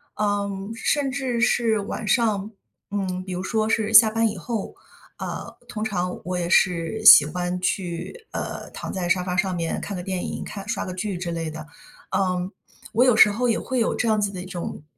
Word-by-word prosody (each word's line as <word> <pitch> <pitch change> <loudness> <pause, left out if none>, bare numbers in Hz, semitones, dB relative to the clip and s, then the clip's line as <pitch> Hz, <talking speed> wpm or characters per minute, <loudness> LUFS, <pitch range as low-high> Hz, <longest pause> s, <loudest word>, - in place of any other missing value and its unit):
嗯， 200 -1 -2
甚 275 +3 0
至 260 -3 -2
是 230 -2 +2
晚 205 +2 -5
上， 215 -1 +1 0.4
嗯， 185 -2 -2
比 190 - -7
如 180 +1 -3
说 215 +2 0
是 220 -1 0
下 220 0 +9
班 225 +1 +2
以 210 - -6
后， 220 +3 -4 0.4
啊， - - -6
通 215 -1 -5
常 180 -4 -2
我 180 0 -2
也 175 -1 -2
是 180 +4 +2
喜 145 - +11
欢 175 +3 -3
去， 185 - -3
呃， - - -5
躺 - - -6
在 180 -2 -2
沙 180 0 +2
发 180 0 -3
上 185 0 +1
面 165 -1 -2
看 200 - -5
个 180 - -5
电 185 -1 -3
影， - - -5
看 200 0 -8
刷 230 - -2
个 185 - -5
剧 185 0 -3
之 175 -1 -4
类 165 -1 -3
的。 155 0 -8 0.5
嗯， 185 -1 0 0.4
我 235 +3 +4
有 250 -3 +5
时 215 -1 +7
候 245 +4 0
也 230 - +1
会 260 -1 -2
有 230 - +1
这 240 - -1
样 215 -1 +3
子 205 -1 0
的 185 - -6
一 180 - -8
种 180 -4 -6
195 Hz, 225 characters per minute, -24 LUFS, 180-220 Hz, 0.5 s, 喜